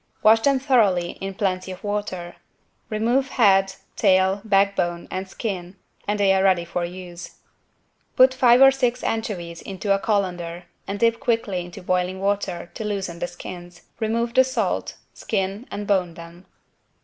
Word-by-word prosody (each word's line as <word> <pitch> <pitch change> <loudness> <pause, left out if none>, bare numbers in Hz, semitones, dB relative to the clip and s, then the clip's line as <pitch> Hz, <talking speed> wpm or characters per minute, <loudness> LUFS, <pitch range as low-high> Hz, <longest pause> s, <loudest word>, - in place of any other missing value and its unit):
Wash 220 +1 +7
them 275 +4 +3
thoroughly 215 -10 +2
in 195 0 -5
plenty 185 -2 -2
of 185 - -10
water. 205 -4 -4 0.5
Remove 240 +5 +1
head, 195 -6 +3 0.2
tail, 190 -1 +3
backbone 195 -4 +1
and 190 +1 -4
skin 185 -4 -5 0.3
and 205 0 -1
they 195 -1 +4
are 190 - +2
ready 185 -3 +3
for 175 +1 -3
use. 175 -1 -8 0.8
Put 260 0 +6
five 250 0 +6
or 270 - +9
six 250 -2 -1
anchovies 180 -7 -3
into 195 +1 -2
a 195 - +1
colander 180 -5 -2 0.2
and 200 +1 -4
dip 230 0 +2
quickly 215 -7 -1
into 175 0 -11
boiling 185 +1 -1
water 195 -3 -2
to 220 - -6
loosen 195 -5 -3
the 175 - -2
skins, 175 0 -10 0.2
remove 230 +1 -1
the 260 - +6
salt, 260 0 -2 0.2
skin 200 +3 -3
and 205 - -5
bone 185 -4 0
them. 170 +2 -12
195 Hz, 155 wpm, -23 LUFS, 180-220 Hz, 0.8 s, or